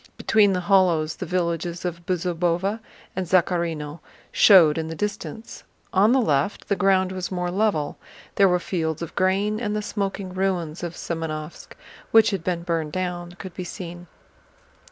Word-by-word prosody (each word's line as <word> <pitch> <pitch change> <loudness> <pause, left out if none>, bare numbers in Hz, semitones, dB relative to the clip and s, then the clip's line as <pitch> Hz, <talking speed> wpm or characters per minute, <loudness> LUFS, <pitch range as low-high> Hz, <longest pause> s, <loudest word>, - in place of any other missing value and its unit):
Between 205 -3 +3
the 180 - -1
hollows 175 -5 +2
the 185 - -5
villages 170 0 -2
of 170 -1 -4
Bezúbova 180 +3 0 0.4
and 185 -1 -2
Zakhárino 170 -4 0 0.3
showed 165 -6 +6
in 160 - -3
the 160 - -5
distance. 210 +3 -5 0.3
On 200 +4 +5
the 265 - +4
left 150 - 0
the 200 - +3
ground 190 -1 +2
was 185 -1 -4
more 180 -1 -2
level; 185 -7 0 0.3
there 195 - +5
were 180 - +3
fields 165 -3 -2
of 165 - -7
grain, 200 +3 +1
and 210 -3 -2
the 210 - -2
smoking 195 -2 -3
ruins 185 -4 -1
of 175 -1 -5
Semënovsk, 160 -1 -5 0.4
which 225 -1 +5
had 190 -4 -3
been 175 -1 -2
burned 165 -3 -2
down, 175 -1 -3
could 185 0 -9
be 185 - -5
seen. 175 -1 -8
180 Hz, 160 wpm, -24 LUFS, 170-195 Hz, 0.4 s, showed